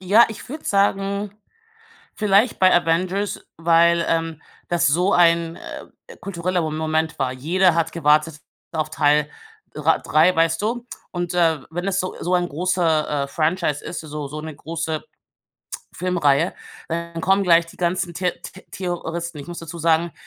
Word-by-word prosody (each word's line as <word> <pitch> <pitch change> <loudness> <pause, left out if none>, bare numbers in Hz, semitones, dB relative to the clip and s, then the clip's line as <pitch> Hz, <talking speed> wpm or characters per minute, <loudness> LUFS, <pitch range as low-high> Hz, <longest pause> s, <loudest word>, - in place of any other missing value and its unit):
Ja, 200 +5 +5
ich 220 - -9
würde 305 +4 -7
sagen, 200 0 +1 0.8
vielleicht 210 +2 +2
bei 185 0 +5
Avengers, 180 +4 0
weil, 170 +1 +4
ähm, 165 -1 -1 0.3
das 170 -1 +2
so 180 +7 +2
ein, 170 -1 +3
äh, 475 - -11
kultureller 180 -1 -2
Mo 155 -1 -2
Moment 160 0 -1
war. 130 -2 0
Jeder 170 +6 +2
hat 165 -1 0
gewartet 155 -1 +2 0.3
auf 155 -1 -2
Teil 150 0 +2 0.4
dr - - +2
3, 165 +4 +3
weißt 165 +1 +2
du? 235 +3 -2 0.3
Und, 175 -1 -3
äh, 165 -4 +2
wenn 175 +3 -4
es 195 0 0
so 185 - -3
so 180 +2 -1
ein 175 0 +1
großer, 160 -3 0
äh, - - -5
Franchise 155 0 -1
ist - - -5
so 150 -2 -6
so 150 +2 -7
'ne 155 -1 -7
große 160 0 -4 0.9
Filmreihe, 170 -6 +1 0.3
dann 170 0 -4
kommen 195 +2 +3
gleich 170 -2 +5
die 165 - -15
ganzen 175 0 -1
The 180 +1 0 0.2
The 190 - -13
Theoristen. 170 -2 -4
Ich 140 - -10
muss 175 0 -7
dazu 165 +1 -8
sagen, 165 0 +2
170 Hz, 160 wpm, -22 LUFS, 160-185 Hz, 0.9 s, Ja